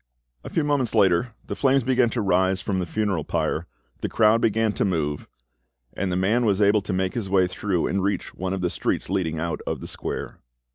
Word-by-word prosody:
A -, -, -7 dB
few 160 Hz, -, 0 dB
moments 140 Hz, -6 st, 0 dB
later 100 Hz, +3 st, +3 dB
the -, -, -4 dB
flames 135 Hz, -1 st, +3 dB
began 125 Hz, -1 st, +3 dB
to 115 Hz, 0 st, -2 dB
rise 95 Hz, -1 st, +2 dB
from 95 Hz, 0 st, -2 dB
the 90 Hz, -, -2 dB
funeral 100 Hz, -4 st, -1 dB
pile, 80 Hz, +3 st, -1 dB, 0.3 s
the -, -, -3 dB
crowd 110 Hz, +1 st, +4 dB
began 110 Hz, 0 st, +2 dB
to -, -, 0 dB
move, 75 Hz, -6 st, -1 dB, 0.7 s
and 95 Hz, -2 st, -2 dB
the -, -, 0 dB
than 105 Hz, +7 st, +2 dB
was 100 Hz, -4 st, +2 dB
able 105 Hz, 0 st, +4 dB
to 100 Hz, -, -5 dB
make 95 Hz, 0 st, 0 dB
his 110 Hz, -5 st, -3 dB
way 95 Hz, -1 st, +4 dB
through 90 Hz, -1 st, -1 dB
and 100 Hz, -, 0 dB
reach 100 Hz, -1 st, -2 dB
one 95 Hz, +1 st, -3 dB
of 95 Hz, -, -4 dB
the 90 Hz, -, 0 dB
streets -, -, -2 dB
leading 85 Hz, -5 st, -1 dB
out 85 Hz, +1 st, -3 dB
of -, -, -2 dB
the -, -, -7 dB
square. -, -, -5 dB
100 Hz, 220 wpm, -24 LUFS, 90-110 Hz, 0.7 s, crowd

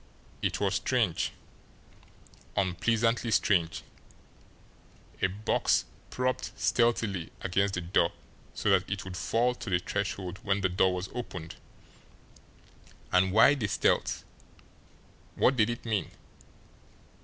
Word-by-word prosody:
It -, -, -1 dB
was -, -, +1 dB
strange -, -, +1 dB, 1.3 s
unpleasantly 115 Hz, +5 st, +1 dB
strange 85 Hz, -6 st, +2 dB, 1.4 s
a -, -, +4 dB
box 100 Hz, +3 st, +1 dB, 0.2 s
propped 125 Hz, 0 st, -2 dB
stealthily 115 Hz, -7 st, +1 dB
against 95 Hz, +1 st, +1 dB
the 90 Hz, -, -2 dB
door 85 Hz, 0 st, +2 dB, 0.4 s
so 105 Hz, -, +1 dB
that 95 Hz, -1 st, +2 dB
it 100 Hz, -1 st, -3 dB
would 95 Hz, -1 st, -7 dB
fall 115 Hz, +8 st, +1 dB
to 120 Hz, -, -7 dB
the 90 Hz, -, +3 dB
threshold 95 Hz, 0 st, -3 dB
when 100 Hz, 0 st, 0 dB
the 95 Hz, -, +2 dB
door 90 Hz, +1 st, +2 dB
was 90 Hz, +1 st, -4 dB
opened! 90 Hz, -9 st, -6 dB, 1.5 s
And 95 Hz, 0 st, +4 dB
why 110 Hz, +7 st, +7 dB
the 125 Hz, -8 st, -1 dB
stealth? -, -, +1 dB, 1.1 s
What 135 Hz, -, +3 dB
did 110 Hz, -2 st, +3 dB
it 120 Hz, 0 st, -5 dB
mean? 105 Hz, -6 st, -1 dB
100 Hz, 115 wpm, -29 LUFS, 90-115 Hz, 1.5 s, why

